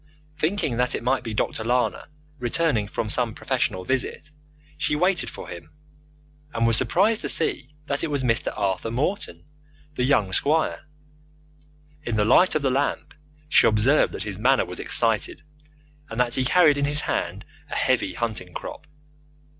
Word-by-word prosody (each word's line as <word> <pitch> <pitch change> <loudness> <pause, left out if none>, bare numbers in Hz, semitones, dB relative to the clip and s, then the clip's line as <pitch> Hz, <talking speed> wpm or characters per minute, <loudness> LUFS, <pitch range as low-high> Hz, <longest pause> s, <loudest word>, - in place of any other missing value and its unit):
Thinking 155 - -1
that 125 0 +1
it - - -5
might 130 +2 +1
be 115 -2 -6
Dr. 110 +1 -2
Lana 125 +4 -1 0.3
returning 120 -3 +1
from 110 - -3
some 115 +1 -1
professional 125 -8 -2
visit, 135 +5 -2 0.4
she 150 - -1
waited 180 +4 +1
for - - -10
him, 85 - -10 0.9
and 115 0 +1
was 115 -1 +3
surprised 210 - +2
to - - -3
see 150 -3 +1
that 140 0 -2
it - - 0
was 140 -2 -1
Mr. 115 -1 +1
Arthur 100 +1 -1
Morton, 145 - -3 0.5
the 125 - -2
young 115 -8 +2
squire. 155 +7 +1 1.2
In 120 -5 -3
the 105 -1 +2
light 175 - +4
of 155 - 0
the 135 - +2
lamp 140 +2 -1 0.3
she - - +5
observed 115 +7 +3
that - - -4
his 105 -3 -5
manner 130 +4 +3
was 90 - -8
excited, 115 -3 +1 0.7
and 115 - -6
that 125 -1 +1
he 130 - 0
carried 150 0 +4
in 140 - +1
his 145 +1 +1
hand - - -3 0.2
a - - -5
heavy - - +1
hunting 110 -7 -4
crop. - - -8
125 Hz, 165 wpm, -24 LUFS, 115-150 Hz, 1.2 s, she